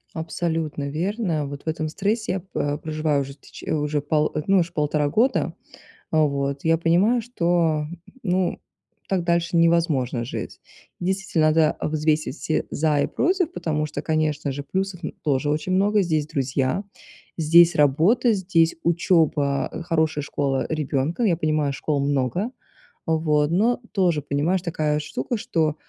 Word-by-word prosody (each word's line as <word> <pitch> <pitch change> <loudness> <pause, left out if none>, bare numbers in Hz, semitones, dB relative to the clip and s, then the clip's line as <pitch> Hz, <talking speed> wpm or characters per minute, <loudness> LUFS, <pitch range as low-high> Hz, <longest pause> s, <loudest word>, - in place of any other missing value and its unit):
Абсолютно 160 -3 -2
верно. 170 -1 -1
Вот 140 0 -8
в - - -21
этом 160 0 -1
стрессе 205 +4 -1
я, 190 - -1
п 145 -5 -3
проживаю 155 -2 -1
уже 140 0 -6
тч 140 - -14
уже 150 -1 -1
пал 150 +1 0
э, 150 - -1
ну, 195 -1 +4
ш 170 0 -4
полтора 150 -2 0
года. 235 - +1 0.6
Вот 140 -2 0
я 165 0 +4
понимаю, 180 +9 +3
что, 170 -9 +1 0.4
ну, 185 -2 0 0.5
так 190 -3 0
дальше 170 0 0
невозможно 165 -8 +2
жить. 125 - -6 0.4
И 175 - -4
действительно, 185 -5 +1
да, 160 -1 +3
взвесить 155 -2 0
все 155 - -1
"за 150 -1 +1
и - - +2
против", 360 -1 0
потому 150 - -1
что, 150 -1 -5
конечно 155 -2 0
же, 140 +1 -5
плюсов, 190 +4 -3
м, 160 - -5
тоже 145 -1 +1
очень 155 +5 -1
много. 200 +3 +3
Здесь 155 -5 0
друзья, 135 +3 -1 0.5
здесь 170 +2 +6
работа, 165 - +3
здесь 175 -4 +2
учеба, 160 -5 +2
э, 160 - -6
хорошая 160 -3 0
школа 135 -2 -1
ребенка. 155 - -1
Ну, 220 - +4
я 170 - +1
понимаю, 155 -3 0
школ 140 +1 -1
много, 140 - 0 0.6
вот. 155 -2 +2
Но 225 +8 +2
тоже, 175 -7 +1
понимаешь, 150 +6 0
такая 155 -4 -1
штука, 150 - -3
что, 165 -9 0
160 Hz, 155 wpm, -23 LUFS, 150-175 Hz, 0.6 s, здесь